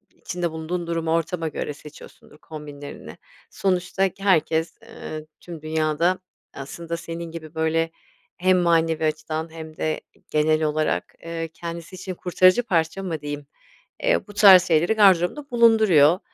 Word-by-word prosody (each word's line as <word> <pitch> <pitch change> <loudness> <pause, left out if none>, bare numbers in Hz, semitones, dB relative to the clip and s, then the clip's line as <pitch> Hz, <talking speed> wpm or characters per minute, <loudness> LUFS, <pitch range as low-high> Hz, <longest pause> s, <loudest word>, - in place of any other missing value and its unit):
içinde 175 -2 -4
bulunduğun 165 +2 -4
durumu 165 -1 -1
ortama 165 0 -1
göre 150 -1 -4
seçiyorsundur 150 0 -14
kombinlerini. 145 -2 -10 0.3
Sonuçta 190 0 0
k 195 - -13
herkes, 165 -3 +2
eee, 155 0 -8
tüm 170 -3 -10
dünyada 160 +3 0 0.3
aslında 165 +5 -6
senin 165 0 -7
gibi 160 -1 -9
böyle 160 +1 +1 0.5
hem 185 +1 +3
manevi 165 -2 +2
açıdan 155 +1 -2
hem 160 -1 -10
de 155 0 -2 0.3
genel 155 +1 +2
olarak, 155 0 -1
eee, 165 -1 -4
kendisi 170 +1 -7
için 185 0 -6
kurtarıcı 185 +5 +3
parça 170 -2 0
mı 165 -5 -4
diyeyim, 145 -1 -6 0.6
eee, - - +1
bu 205 - -11
tarz 195 -3 +8
şeyleri 170 +5 +3
gardırobunda 200 - +3
bulunduruyor 215 -9 +5
165 Hz, 135 wpm, -23 LUFS, 155-180 Hz, 0.6 s, tarz